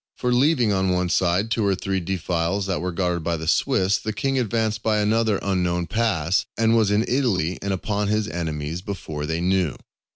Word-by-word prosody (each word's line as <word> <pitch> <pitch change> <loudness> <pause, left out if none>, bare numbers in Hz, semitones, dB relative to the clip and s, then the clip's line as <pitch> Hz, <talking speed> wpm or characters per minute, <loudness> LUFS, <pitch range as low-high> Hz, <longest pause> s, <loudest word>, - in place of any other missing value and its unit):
For 125 -1 0
leaving 125 -4 +3
on 95 -1 +1
one 90 -1 0
side 95 +5 +1
two 115 - +1
or 100 -1 +2
three 95 +1 -2
defiles 90 +1 -1
which 95 - -1
were 90 +1 -2
guarded 90 -2 -1
by 85 +1 -1
the 80 0 -6
Swiss, 95 +3 +2
the 110 - -3
king 135 +5 -1
advanced 110 -2 -1
by 110 -1 +1
another 110 0 +2
unknown 90 -3 0
pass, 95 -3 +1
and 115 0 +3
was 110 -3 +3
in 105 +3 +2
Italy 100 - 0
and 100 - -2
upon 100 +2 -1
his 105 0 0
enemies 80 -3 -4
before 80 -7 -5
they 80 +2 -2
knew. 90 -4 +1
95 Hz, 195 wpm, -23 LUFS, 85-110 Hz, -, leaving